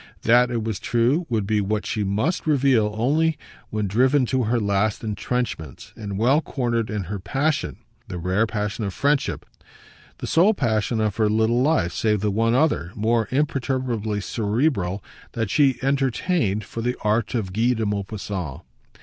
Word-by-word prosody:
That, 120 +2 +5
it 115 -2 -2
was 110 -3 -3
true, 125 +9 +1
would 110 -4 0
be 105 0 +1
what 105 +2 -1
she 105 - -1
must 110 - -1
reveal 130 -8 +3
only 150 +7 +2 0.3
when 105 -1 -2
driven 130 +7 +3
to 130 0 0
her 120 +2 +1
last 100 +1 0
entrenchments 105 - -4
and 100 -2 -5
well 130 +8 +3
cornered 120 -7 -1
in 105 -2 -2
her 100 +3 -5
passion 140 +10 -1 0.3
the 90 - -5
rare 95 +6 +1
passion 105 0 -3
of 100 -2 -3
friendship, 140 0 0 0.7
the - - -6
sole 195 +6 +4
passion 110 - 0
of 105 -2 0
her 110 -2 +3
little 110 +3 +2
life 130 - +2
save 105 -3 +1
the 105 -1 +1
one 115 +3 +2
other, 130 - +1
more 115 +1 +1
imperturbably 130 -6 -1
cerebral, 105 - -1 0.3
that 115 -3 -2
she 135 -4 +3
entertained 135 - 0
for 115 +4 -6
the 125 +2 -1
art 105 +2 +1
of 95 -6 -2
Guy 115 +5 +2
de 110 -2 -2
Maupassant. 100 -6 -4
115 Hz, 165 wpm, -23 LUFS, 105-130 Hz, 0.7 s, That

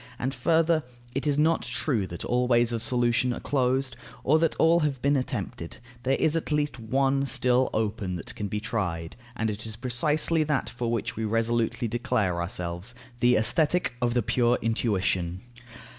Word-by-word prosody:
And 130 +2 -2
further, 165 +1 +2 0.3
it 135 +3 -2
is 145 -1 +2
not 160 +2 +3
true 115 -11 -1
that 85 -1 -6
all 125 +1 +1
ways 120 -1 +4
of 115 -1 -2
solution 120 +1 +1
are - - -5
closed, 130 -1 0 0.3
or 155 +4 +4
that 165 -1 +1
all 165 +1 +4
have 145 -5 -1
been 140 +3 +2
attempted. 125 -9 -3 0.2
There 130 +2 +1
is 160 0 +2
at 165 - -2
least 150 -3 0
one 135 +4 +1
still 125 -1 +2
open 105 -4 -2
that 85 - -7
can 105 - -4
be 105 +2 -3
tried; 90 -7 -3 0.2
and 110 -2 -1
it 105 +2 -7
is 110 - -7
precisely 150 +7 +1
that 150 -3 -1
for 120 -1 -3
which 115 -2 -2
we 110 - -3
resolutely 115 +2 0
declare 105 -6 0
ourselves: 90 +5 -4 0.2
the 120 0 +4
Aesthetic 155 +6 +2
of 120 0 +1
the 120 - +2
pure 120 +2 +2
intuition. 95 -6 0
120 Hz, 175 wpm, -27 LUFS, 110-140 Hz, 0.3 s, ways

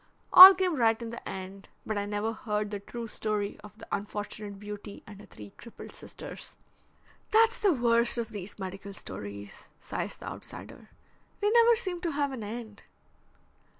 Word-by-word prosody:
All 375 +1 +13
came 365 -4 0
right 225 -2 +3
in 230 -1 -6
the 235 - -8
end, 190 +1 -8 0.2
but 215 - -3
I 205 0 -2
never 210 +2 -2
heard 210 -2 -3
the 205 - -4
true 235 +4 -7
story 210 -2 -3
of 210 0 -13
the - - -12
unfortunate 205 0 -5
beauty 205 0 -9
and 205 -1 -12
her - - -15
three 105 -1 -12
crippled 235 - -12
sisters." - - -10 0.7
"That's 455 +1 +4
the 410 -4 +3
worst 235 -4 +2
of 235 -1 -3
these 205 -3 -8
medical 195 +1 -7
stories," 100 - -9
sighs - - -5
the - - -11
outsider. - - -10 0.5
"They 415 0 +1
never 470 0 +6
seem 370 -7 -3
to 340 -3 -2
have 285 -1 -1
an 250 -5 -6
end." 220 -1 -8
215 Hz, 170 wpm, -28 LUFS, 205-260 Hz, 0.7 s, All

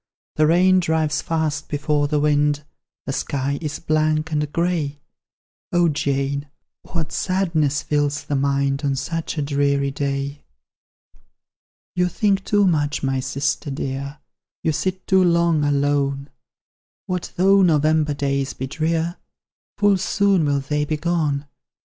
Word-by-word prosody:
The 155 0 +4
rain 185 +3 +5
drives 160 -3 0
fast 155 -2 -2
before 150 0 0
the 150 0 +1
wind, 145 0 +2 0.4
The 135 - -3
sky 140 +1 -2
is 155 -2 -3
blank 155 0 0
and 150 -1 -1
grey; 165 -4 -1 0.7
O 175 -1 +3
Jane, 140 0 -1 0.3
what 160 -3 -4
sadness 165 -6 0
fills 145 -1 0
the 145 - -2
mind 140 0 +1
On 140 -1 +1
such 165 +4 -3
a 150 - 0
dreary 140 -1 +1
day!" 140 +1 -3 1.5
"You 180 0 +2
think 195 +2 +1
too 205 0 +3
much, 150 -5 +1
my 135 -1 0
sister 135 0 -2
dear; 140 +1 -4 0.5
You 160 - +2
sit 185 +5 -2
too 190 -1 +4
long 170 -3 +3
alone; 140 -1 0 0.7
What 180 -1 -4
though 195 +2 +5
November 155 -3 +3
days 140 -1 -1
be 130 - -5
drear? 165 +4 -1 0.6
Full 205 -1 +4
soon 195 -3 +2
will 140 -1 +1
they 150 +2 -1
be 150 +1 -2
gone. 150 -3 0
150 Hz, 135 wpm, -22 LUFS, 140-170 Hz, 1.5 s, rain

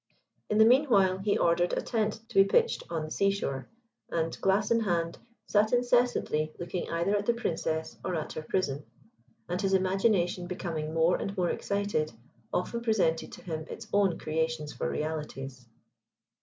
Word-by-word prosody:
In 210 - +1
the 220 - +7
meanwhile 225 -8 +4
he 200 +1 +1
ordered 175 +1 +2
a - - 0
tent 220 -2 -1
to - - -12
be 195 - +7
pitched 465 - +2
on 165 -2 -2
the 155 - -9
sea 200 - +2
shore, 140 -10 -3 0.4
and, 165 -1 -1
glass 195 +3 +2
in 230 - +5
hand, 170 -6 -1 0.3
sat 215 +2 +2
incessantly 245 -11 +2
looking 175 +1 -4
either 170 +5 +1
at 205 0 -1
the 235 - +3
Princess 160 -7 -2
or 185 - -2
at 155 - -3
her - - -4
prison, 155 -3 -1 0.6
and 180 +2 -2
his 195 -1 +2
imagination 185 -2 +1
becoming 165 -4 -4
more 165 +2 +3
and 200 +1 -4
more 175 -2 +1
excited, 200 - -1 0.4
often 235 +6 -1
presented 195 -8 +1
to - - -11
him 160 -3 -4
its - - -7
own 200 -4 +3
creations 160 -1 -2
for - - -2
realities. 135 -5 -4
180 Hz, 170 wpm, -29 LUFS, 160-205 Hz, 0.6 s, the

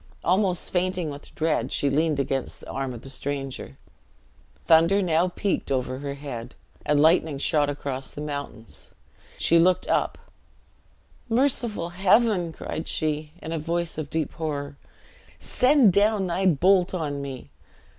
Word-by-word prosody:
Almost 185 0 +1
fainting 180 -3 0
with 145 +1 -11
dread, 155 -6 0
she 145 - 0
leaned 150 +1 +1
against 135 -1 -2
the - - -11
arm 135 -1 -3
of 120 -2 -9
the 135 - -9
stranger. 135 -1 -5 0.9
Thunder 165 +5 +5
now 175 -2 +2
peaked 185 -4 -2
over 130 -1 -1
her 140 0 -5
head, 125 -4 -7 0.3
and 150 -1 +2
lightning 160 -1 +3
shot 145 +1 +1
across 140 -2 -3
the - - -9
mountains. 145 -6 -7 0.4
She 170 - +4
looked 180 +2 +3
up: - - 0 1.1
"Merciful 235 -7 +1
Heaven!" 190 0 +3
cried 160 0 -6
she, 155 -1 -2
in 160 - -5
a 165 - -2
voice 170 +1 -2
of 150 -2 -5
deep 160 -2 -2
horror; 145 -3 -4 0.6
"send 255 -6 +4
down 205 0 +3
thy 185 +2 0
bolt 185 +3 +3
on 145 -5 -3
me!" 130 - -7
160 Hz, 145 wpm, -25 LUFS, 140-180 Hz, 1.1 s, Thunder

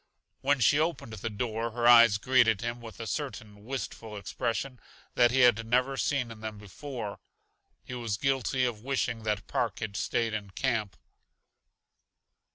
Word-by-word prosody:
When 140 +1 +2
she 135 +5 +4
opened 160 -8 -1
the 110 +1 -4
door 115 +1 -2
her 120 0 +1
eyes 120 -3 +8
greeted 115 -3 +3
him 120 +1 -4
with 115 -1 -10
a 115 - -5
certain 110 -4 -5
wistful 115 -3 -6
expression 120 +5 -3 0.3
that 120 -1 +5
he 130 +2 +2
had 120 -2 +5
never 125 +4 +1
seen 130 -3 0
in 110 - -10
them 110 -1 -5
before. 105 +2 -7 0.6
He - - -8
was 115 -5 -2
guilty 135 -1 +1
of 115 -4 -3
wishing 125 -3 -1
that 105 -3 -1
Park - - -1
had 110 -3 -5
stayed 115 +3 0
in 105 -2 -4
camp. 110 - -2
115 Hz, 160 wpm, -29 LUFS, 110-130 Hz, 0.6 s, eyes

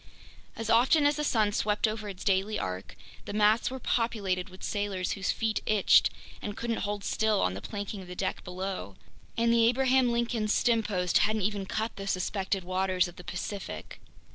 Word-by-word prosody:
As 225 - -5
often 255 +7 +4
as 290 +1 +3
the 300 - -1
sun 220 -7 +2
swept 210 +1 +1
over 215 -1 -4
its 190 -2 -8
daily 195 +2 +1
arc, 95 0 -5 0.3
the - - -6
masts 210 +2 +3
were 260 - -5
populated 205 -7 -1
with 185 +1 -14
sailors 200 -3 -2
whose 190 -2 0
feet 225 -1 -1
itched 210 -3 +5 0.3
and 205 0 -5
couldn't 235 -1 -2
hold 205 0 -3
still 215 0 +1
on 90 - +1
the 95 - -6
planking 205 - -5
of 185 - -11
the 180 - -7
deck - - -2
below! 180 - -5 0.4
And 230 0 +3
the 230 -1 +5
Abraham 260 0 +3
Lincoln's 235 -2 0
stempost 210 -7 +2
hadn't 215 0 +1
even 200 -1 -1
cut 220 +2 -3
the 195 0 -6
suspected 190 0 -1
waters 185 0 +1
of 175 - -12
the 180 - -10
Pacific. 190 +3 -6
205 Hz, 185 wpm, -29 LUFS, 190-225 Hz, 0.4 s, itched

